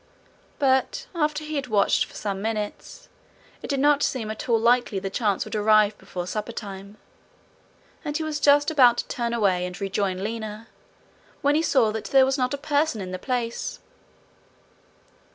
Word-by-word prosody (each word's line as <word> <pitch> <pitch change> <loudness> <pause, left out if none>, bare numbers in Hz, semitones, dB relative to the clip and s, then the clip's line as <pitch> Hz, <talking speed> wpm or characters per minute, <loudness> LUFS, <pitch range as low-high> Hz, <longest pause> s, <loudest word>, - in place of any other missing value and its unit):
But 265 -2 +1
after 305 -2 -1
he 305 0 -4
had 275 -2 -3
watched 205 -4 +2
for - - -17
some 195 -2 -3
minutes, 220 - -5 0.5
it - - -7
did 275 - 0
not 290 +1 +4
seem 225 -7 -1
at 220 +3 -7
all 230 -1 +4
likely 240 -2 +2
the 195 0 -4
chance 205 -3 0
would - - -9
arrive 215 0 +4
before 180 -1 -6
suppertime, 205 -1 -6 1.1
and 295 -2 -2
he 320 - -3
was 310 -1 -3
just 290 +2 +4
about 250 -6 +5
to - - -3
turn 235 -1 -2
away 195 -6 +1
and 180 0 -5
rejoin 195 -1 -2
Lina, 220 0 -5 0.7
when 285 +1 +4
he 310 - +3
saw 255 -9 +3
that 220 0 -5
there 270 -1 +5
was 265 0 +1
not 255 -2 0
a - - -8
person 295 -3 0
in 185 -2 -6
the 185 - -5
place. 240 0 -3
230 Hz, 170 wpm, -24 LUFS, 205-280 Hz, 1.1 s, about